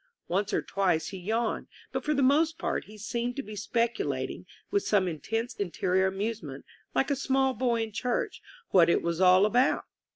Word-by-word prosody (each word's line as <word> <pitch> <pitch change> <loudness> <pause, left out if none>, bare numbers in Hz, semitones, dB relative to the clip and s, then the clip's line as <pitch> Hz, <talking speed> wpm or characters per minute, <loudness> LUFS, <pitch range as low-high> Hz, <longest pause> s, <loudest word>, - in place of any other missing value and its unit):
On 190 +3 +2
e - - +1
or - - 0
twice 180 -5 0
he 190 - -7
yawned, 220 +5 -1 0.2
but - - -3
for 300 0 +1
the 275 - +2
most 315 +5 +3
part - - -2
he 215 +1 -13
seemed 235 +3 -3
to 275 - -3
be 215 -2 -8
speculating, 230 +3 -2 0.2
with 405 - +2
some 200 - +2
intense 225 - -3
interior 190 0 0
amusement, 195 -8 -4 0.3
like 270 - +2
a - - +3
small 265 0 +1
boy 235 -1 +1
in 220 - -6
church, 245 +3 -2 0.3
what 170 -3 +6
it - - +2
was 170 +1 -1
all 185 +1 +7
about. 245 +5 +3
220 Hz, 190 wpm, -28 LUFS, 190-250 Hz, 0.3 s, all